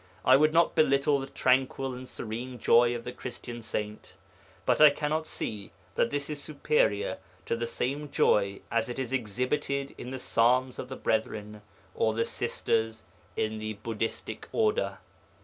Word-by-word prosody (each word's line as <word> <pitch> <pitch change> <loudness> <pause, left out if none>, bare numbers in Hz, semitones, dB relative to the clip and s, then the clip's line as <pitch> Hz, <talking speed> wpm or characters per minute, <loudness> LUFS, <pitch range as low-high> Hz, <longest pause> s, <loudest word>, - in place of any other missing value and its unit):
I 130 - +8
would 155 +3 +5
not 165 +1 +4
belittle 140 -1 +3
the 135 - -5
tranquil 130 0 +1
and 125 +1 -8
serene 120 +3 -5
joy 120 +1 +4
of 120 - -5
the 125 - -5
Christian 120 -1 -7
saint, 105 -1 -5 0.5
but - - +3
I 150 - +11
cannot 155 +2 -1
see 105 -3 -5 0.2
that - - +2
this 145 0 -2
is 150 -2 -5
superior 140 -10 +1 0.3
to - - 0
the 115 0 -2
same 140 +5 -2
joy 100 -6 +2
as 115 0 +1
it 120 - -5
is 130 -1 -3
exhibited 135 +4 -1
in 125 - -6
the 130 - -4
Psalms 125 +1 +2
of 125 - -5
the 130 - -5
Brethren 105 -2 -2 0.3
or 110 -1 +1
the 115 - +1
Sisters 110 -2 -1 0.3
in 110 0 -1
the 110 0 -3
Buddhistic 115 0 -3
Order. 445 +2 +1
125 Hz, 165 wpm, -29 LUFS, 110-140 Hz, 0.5 s, I